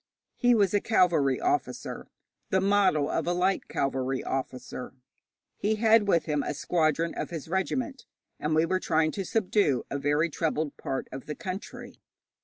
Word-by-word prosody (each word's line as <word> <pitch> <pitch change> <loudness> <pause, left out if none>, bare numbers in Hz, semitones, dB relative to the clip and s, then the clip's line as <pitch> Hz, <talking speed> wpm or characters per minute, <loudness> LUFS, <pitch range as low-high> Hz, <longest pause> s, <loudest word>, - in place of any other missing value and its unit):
He 245 -1 +4
was 200 -4 +3
a 205 - +3
cavalry 165 - +3
officer, 365 0 -2 0.4
'the 190 -1 +2
model 195 -7 +3
of - - -1
a 175 - +2
light 185 +2 +1
cavalry 135 -1 -1
officer'; 130 -1 -5 0.6
he 215 +2 +1
had 220 -1 +4
with 170 -4 +3
him 150 -2 0
a 150 - -3
squadron 165 +1 +1
of - - -4
his 165 -4 -6
regiment, 245 - -2 0.3
and 155 +1 0
we 160 +1 +4
were 185 +2 0
trying 160 -3 +1
to 195 - -3
subdue 185 - +1
a 140 - -2
very 145 +4 +1
troubled 155 -1 -1
part 135 - -4
of 135 - -8
the 150 - -4
country. 185 +5 -7
170 Hz, 165 wpm, -28 LUFS, 145-200 Hz, 0.6 s, He